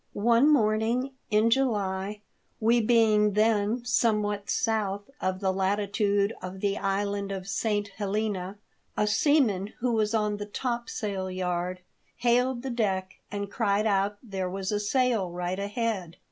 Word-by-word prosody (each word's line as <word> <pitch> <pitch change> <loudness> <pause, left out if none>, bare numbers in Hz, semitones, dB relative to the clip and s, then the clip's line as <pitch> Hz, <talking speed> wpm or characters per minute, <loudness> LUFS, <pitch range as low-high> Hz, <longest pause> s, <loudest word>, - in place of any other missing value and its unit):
One 235 +6 +4
morning 230 +1 +2 0.2
in 215 +1 +3
July, 205 -5 0 0.4
we 235 +2 +3
being 215 -2 +4
then 215 +2 +2
some 230 -3 +2
what 205 -1 -3
south 205 -3 0 0.2
of 185 +1 -1
the 190 -1 +1
latitude 200 +2 +1
of 185 +1 -7
the 200 0 0
island 200 0 -1
of 190 -1 -5
St. 205 +1 0
Helena, 200 -1 -3 0.4
a 210 - +3
seaman 215 -4 +2
who 245 +1 0
was 215 0 +1
on 210 -1 0
the 205 0 -6
top 235 +2 -3
sail 195 -3 -3
yard 180 0 -2 0.3
hailed 245 +1 +1
the 265 - -3
deck, 195 -5 -1
and 200 -1 -4
cried 210 -2 +1
out 200 0 +1
that 230 - -16
there 190 -1 -2
was 190 +1 -3
a 210 - 0
sail 225 -2 +1
right 180 +2 -3
ahead. 200 -4 -2
205 Hz, 150 wpm, -27 LUFS, 195-225 Hz, 0.4 s, One